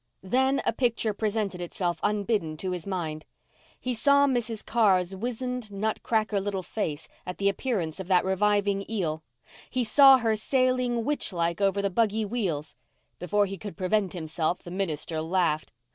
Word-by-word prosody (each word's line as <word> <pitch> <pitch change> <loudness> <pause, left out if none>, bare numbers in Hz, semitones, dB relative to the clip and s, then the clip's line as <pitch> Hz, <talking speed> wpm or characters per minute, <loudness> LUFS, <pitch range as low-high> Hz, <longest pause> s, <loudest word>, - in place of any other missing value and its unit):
Then 265 +7 +2
a - - +2
picture 230 -3 0
presented 205 -3 -2
itself 175 0 -2
unbidden 205 -6 0
to 185 +3 -3
his 180 0 -5
mind. 160 -5 -3 0.6
He 255 - -2
saw 280 +5 +4
Mrs. 240 -5 -1
Carr's 195 -5 +2
wizened, 245 +1 -4
nut 215 +2 -2
cracker 215 -3 0
little 195 -1 -3
face 160 -7 -4 0.2
at 180 - -6
the 200 - +1
appearance 195 - -1
of 190 - -6
that 185 -1 +3
reviving 200 +1 +1
eel—he 160 - -4
saw 270 +4 +8
her 225 -3 +1
sailing 250 0 +1
witch 295 -4 -1
like 170 +1 -1
over 200 0 +2
the 200 - 0
buggy 220 +1 +1
wheels. 190 -9 -3 0.4
Before 200 +4 +1
he 195 0 -6
could 205 -6 -8
prevent 190 0 0
himself 160 0 -2
the 175 - -8
minister 165 -4 -2
laughed. 165 -2 0
200 Hz, 160 wpm, -27 LUFS, 180-225 Hz, 0.6 s, saw